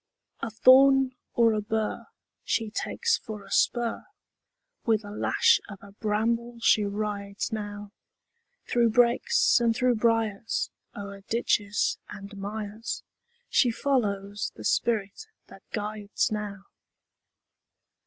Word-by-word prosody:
A - - -3
thorn 260 +3 +6 0.2
or 230 -1 +4
a 215 - 0
bur 220 +1 -2 0.4
She 225 -2 -1
takes 465 - 0
for 210 -2 -8
a 195 - -15
spur; 240 +5 +1 0.8
With 220 -2 +1
a 205 - -8
lash 210 - +3
of 200 - -8
a 200 - -12
bramble 230 +3 -1
she 215 -2 +4
rides 200 0 -3
now, 205 -1 -5 0.8
Through 235 -1 +3
brakes 240 +2 +3
and 230 -1 +2
through 250 +1 +3
briars, 225 -1 0 0.2
O'er 200 -1 -8
ditches 210 -3 +1
and 200 +1 -9
mires, 210 +2 -5 0.4
She 250 - +3
follows 205 -6 -1
the - - -10
spirit 220 - 0 0.2
that - - -14
guides 210 -1 -2
now. 205 -2 -4
215 Hz, 115 wpm, -27 LUFS, 205-235 Hz, 0.8 s, thorn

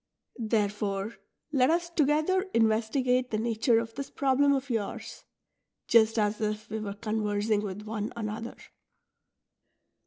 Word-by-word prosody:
Therefore 210 -2 -1 0.4
let 265 -3 +3
us 340 +1 +1
together 310 +5 +2
investigate 235 +3 +2
the 215 - -1
nature 225 +1 +2
of 225 0 -2
this 275 +2 -5
problem 280 +1 +2
of 270 -1 0
yours, 225 0 -4 0.6
just 225 -1 +5
as 210 0 +1
if 215 0 -2
we 220 - -2
were 200 -2 -5
conversing 210 -1 0
with 205 0 -5
one 215 0 -4
another.'' 225 +1 -5
225 Hz, 125 wpm, -28 LUFS, 215-255 Hz, 0.6 s, just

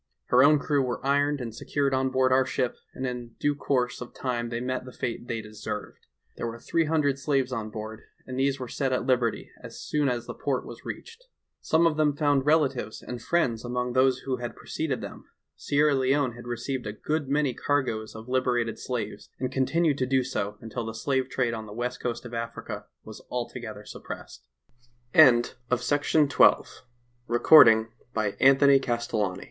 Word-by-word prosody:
Her 125 +1 +6
own 150 +2 +6
crew 145 0 +1
were 125 0 -3
ironed 145 0 +2
and 115 -2 -5
secured 140 +4 -1
on 130 0 +1
board 130 0 +2
our 130 +1 +5
ship, 130 -1 -1 0.2
and 130 - -4
in 120 -2 -5
due 145 - +2
course 125 -4 -1
of 125 - -9
time 120 -2 -2
they 115 0 -3
met 130 +1 -2
the 130 - -10
fate 120 -1 -4
they 115 -1 -3
deserved. 105 0 -7 0.3
There - - -3
were 115 0 -6
three 165 +7 0
hundred 150 -3 +1
slaves 135 -2 0
on 110 -3 -3
board, 110 +1 -7 0.2
and 130 0 -5
these 135 0 +1
were 125 - -5
set 135 +2 -2
at 125 - 0
liberty 125 -3 0
as - - -10
soon 150 -2 0
as 120 -1 -2
the - - -6
port - - -2
was - - -10
reached. 470 +2 -8 0.3
Some 160 +1 +2
of 160 -2 +2
them 150 -2 +2
found 145 -2 +1
relatives 145 -8 +1
and 125 -2 -6
friends 120 -6 0
among 125 0 -2
those 130 0 +3
who 130 -2 -1
had 120 -1 -6
preceded 150 -5 -3
them; - - -9 0.3
Sierra 145 +1 +2
Leone 135 0 +2
had 120 +1 -11
received 120 0 -3
a 105 - -4
good 150 +5 -2
many 145 -2 +1
cargoes 115 -7 -1
of 110 +1 -9
liber 125 -1 +1
ated 115 -2 -2
slaves 125 -2 -5
and 130 -1 -2
continued 145 +3 +1
to 130 - 0
do 130 -1 +2
so 105 -5 -3
until 115 +1 -5
the 115 0 -5
slave 130 +2 -1
trade 125 -3 0
on 110 -1 -6
the 105 - -9
west 125 +2 -4
coast 120 0 -3
of 120 - -9
Africa 115 0 -5 0.2
was - - -10
altogether 120 -3 -5
supp - - -9
130 Hz, 175 wpm, -27 LUFS, 120-140 Hz, 0.3 s, Her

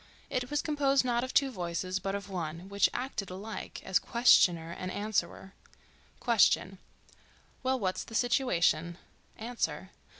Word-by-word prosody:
It 250 0 -2
was 295 0 -1
composed 280 -4 +2
not 240 -1 +1
of 260 - -4
two 275 -1 +3
voices, 185 -1 -3
but 195 +1 -3
of 200 0 -5
one, 170 -2 -5
which 200 0 +3
acted 245 -6 -4
alike 200 +4 -7
as 190 - +2
questioner 175 -8 +4
and 185 +2 -5
answerer: 195 -2 -2 0.7
Question.—Well—what's 215 +1 -1
the 225 - -9
situation? 175 - +1 0.4
Answer. 195 -7 -3
200 Hz, 125 wpm, -30 LUFS, 180-245 Hz, 0.7 s, questioner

